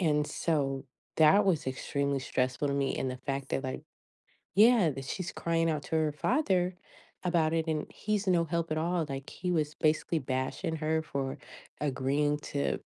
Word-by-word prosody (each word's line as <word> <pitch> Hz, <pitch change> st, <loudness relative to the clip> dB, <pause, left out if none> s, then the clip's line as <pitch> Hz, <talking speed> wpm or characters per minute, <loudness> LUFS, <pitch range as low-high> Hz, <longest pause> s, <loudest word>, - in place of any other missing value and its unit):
and 150 Hz, -4 st, +2 dB
so, 140 Hz, -5 st, -1 dB, 0.3 s
that 195 Hz, +7 st, +6 dB
was 165 Hz, -7 st, +1 dB
extremely 140 Hz, +1 st, -1 dB
stressful 130 Hz, +2 st, -1 dB
to -, -, 0 dB
me, 140 Hz, -1 st, 0 dB
and 130 Hz, -, -1 dB
the 130 Hz, -, -6 dB
fact 135 Hz, 0 st, -4 dB
that, 135 Hz, -, 0 dB
like 130 Hz, -, -4 dB, 0.7 s
yeah, 215 Hz, -5 st, +6 dB
that 135 Hz, 0 st, -6 dB
she's 175 Hz, +5 st, -4 dB
crying 165 Hz, 0 st, 0 dB
out 155 Hz, -2 st, -1 dB
to -, -, -2 dB
her 155 Hz, -1 st, +2 dB
father 185 Hz, -, +1 dB, 0.5 s
about 170 Hz, -3 st, +2 dB
it, 165 Hz, 0 st, 0 dB
and 155 Hz, -1 st, -1 dB
he's 210 Hz, -2 st, -2 dB
no 175 Hz, -2 st, +3 dB
help 165 Hz, 0 st, -2 dB
at 155 Hz, -, 0 dB
all, 170 Hz, +1 st, 0 dB
like, 135 Hz, 0 st, -5 dB
he 180 Hz, 0 st, -3 dB
was 155 Hz, -3 st, 0 dB
basically 155 Hz, +1 st, +1 dB
bashing 130 Hz, +4 st, -2 dB
her 160 Hz, +1 st, 0 dB
for 135 Hz, -3 st, -3 dB, 0.4 s
agreeing 145 Hz, +1 st, +1 dB
to 145 Hz, -1 st, -2 dB
155 Hz, 175 wpm, -30 LUFS, 140-170 Hz, 0.7 s, that